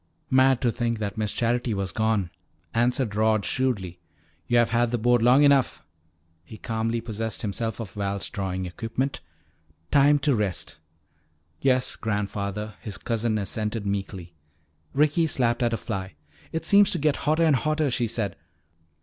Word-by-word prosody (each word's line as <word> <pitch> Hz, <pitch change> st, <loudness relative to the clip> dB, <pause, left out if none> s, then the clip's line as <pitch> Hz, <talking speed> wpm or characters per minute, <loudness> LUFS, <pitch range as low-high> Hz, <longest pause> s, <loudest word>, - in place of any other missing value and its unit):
"Mad 130 Hz, -1 st, +4 dB
to 120 Hz, -, +2 dB
think 115 Hz, -1 st, -1 dB
that 100 Hz, -2 st, -4 dB
Miss 110 Hz, -2 st, -1 dB
Charity 120 Hz, -1 st, 0 dB
was 95 Hz, -1 st, -2 dB
gone," 110 Hz, -5 st, 0 dB, 0.4 s
answered 120 Hz, -1 st, +1 dB
Rod 110 Hz, 0 st, +2 dB
shrewdly. 100 Hz, -10 st, -1 dB, 0.5 s
"Yo've 120 Hz, -1 st, +3 dB
had 120 Hz, +1 st, +2 dB
that 120 Hz, -, 0 dB
board 120 Hz, +1 st, +3 dB
long 125 Hz, +5 st, +5 dB
enough." 135 Hz, -, +3 dB, 0.6 s
He 110 Hz, +6 st, -11 dB
calmly 115 Hz, +2 st, -2 dB
possessed 115 Hz, 0 st, -4 dB
himself 110 Hz, +3 st, -3 dB
of 115 Hz, -4 st, -6 dB
Val's 100 Hz, -1 st, -2 dB
drawing 95 Hz, -4 st, -3 dB
equipment. 115 Hz, +8 st, -3 dB, 0.7 s
"Time 145 Hz, +1 st, +5 dB
to 145 Hz, 0 st, +1 dB
rest." 100 Hz, -9 st, -2 dB, 0.8 s
"Yes, 130 Hz, -2 st, +1 dB
grandfather," 105 Hz, 0 st, -3 dB
his 105 Hz, -3 st, -6 dB
cousin 115 Hz, -1 st, -1 dB
assented 105 Hz, +1 st, -3 dB
meekly. 95 Hz, -3 st, -4 dB, 0.6 s
Ricky 155 Hz, +3 st, +3 dB
slapped 120 Hz, -5 st, 0 dB
at 120 Hz, -1 st, +2 dB
a 115 Hz, -, 0 dB
fly. 95 Hz, -5 st, -5 dB, 0.4 s
"It 160 Hz, -, -3 dB
seems 200 Hz, -1 st, +6 dB
to -, -, 0 dB
get 150 Hz, -2 st, +1 dB
hotter 155 Hz, +2 st, +1 dB
and 155 Hz, -4 st, +4 dB
hotter," 155 Hz, +2 st, 0 dB
she 120 Hz, -1 st, 0 dB
said. 110 Hz, -3 st, -3 dB
115 Hz, 150 wpm, -25 LUFS, 105-130 Hz, 0.8 s, seems